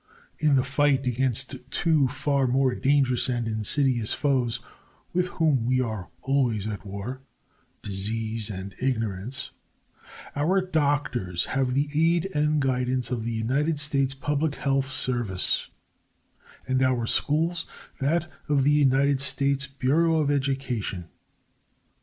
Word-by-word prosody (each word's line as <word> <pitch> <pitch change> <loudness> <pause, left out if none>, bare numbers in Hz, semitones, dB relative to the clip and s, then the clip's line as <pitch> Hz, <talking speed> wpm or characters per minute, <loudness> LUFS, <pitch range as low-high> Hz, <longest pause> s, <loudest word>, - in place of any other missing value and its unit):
In 150 -2 +3
the 130 - +3
fight 135 0 +1
against 125 +1 0
two 155 -2 +2
far 135 0 0
more 130 +1 +2
dangerous 135 -2 +2
and 120 -2 -1
insidious 115 +2 +1
foes 130 -5 0 0.5
with 180 +1 +1
whom 150 -9 +1
we 130 0 +2
are 110 -7 -3
always 125 -7 +1
at 100 -4 -5
war 100 +6 -6 0.6
Disease 110 +2 -2
and 95 -1 -6
Ignorance 115 0 -2 0.8
our 165 +7 +2
doctors 145 - 0
have 130 -2 0
the 140 +2 +1
aid 165 +4 +2
and 150 0 +1
guidance 130 -2 0
of 120 -3 -2
the 115 - -2
United 140 +8 0
States 140 -2 +1
Public 145 +2 -1
Health 135 -1 0
Service 120 -8 0 1.0
and 130 0 +1
our 130 -3 +2
schools 165 +7 +1 0.3
that 160 +5 +1 0.2
of 140 -2 +3
the 145 - +4
United 140 -1 +3
States 140 0 +1
Bureau 140 +5 +1
of 145 -2 +1
Education. 130 -10 -2
135 Hz, 125 wpm, -26 LUFS, 120-145 Hz, 1.0 s, the